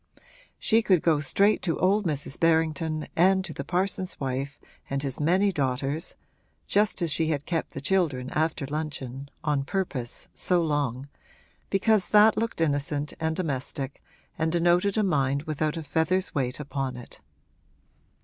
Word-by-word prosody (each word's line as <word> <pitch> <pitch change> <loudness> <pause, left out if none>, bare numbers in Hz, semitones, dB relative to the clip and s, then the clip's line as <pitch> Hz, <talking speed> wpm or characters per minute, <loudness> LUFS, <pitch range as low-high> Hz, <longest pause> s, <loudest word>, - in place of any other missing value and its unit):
She 225 0 +3
could 185 -6 +3
go 160 -3 +3
straight 200 +9 +2
to 165 -3 -1
old 195 +1 +2
Mrs. 145 -3 -2
Berrington 160 -1 +1
and 190 +2 +4
to 160 - -6
the 140 - -5
parson's 185 +2 -1
wife 135 +1 -3 0.3
and 140 0 -1
his 135 -2 -3
many 185 +6 +3
daughters 140 +1 -1 0.5
(just 200 -3 +1
as 165 - 0
she 160 +2 +2
had 150 -2 -1
kept 165 -2 -2
the 135 - -5
children 145 -6 0
after 155 -2 0
luncheon, 140 -2 -5
on 150 -2 +1
purpose, 140 -8 -3
so 180 -1 +1
long) 145 -5 -1 0.6
because 195 -1 +2
that 210 +1 +6
looked 225 -6 -2
innocent 145 -1 0
and 160 0 -1
domestic 140 -4 -4 0.4
and 160 0 +1
denoted 175 +4 +2
a 215 - +3
mind 140 -6 +1
without 155 0 -2
a 165 - -4
feather's 180 +5 +1
weight 130 -3 -1
upon 135 -3 -3
it. 125 - -11
155 Hz, 150 wpm, -27 LUFS, 140-180 Hz, 0.6 s, that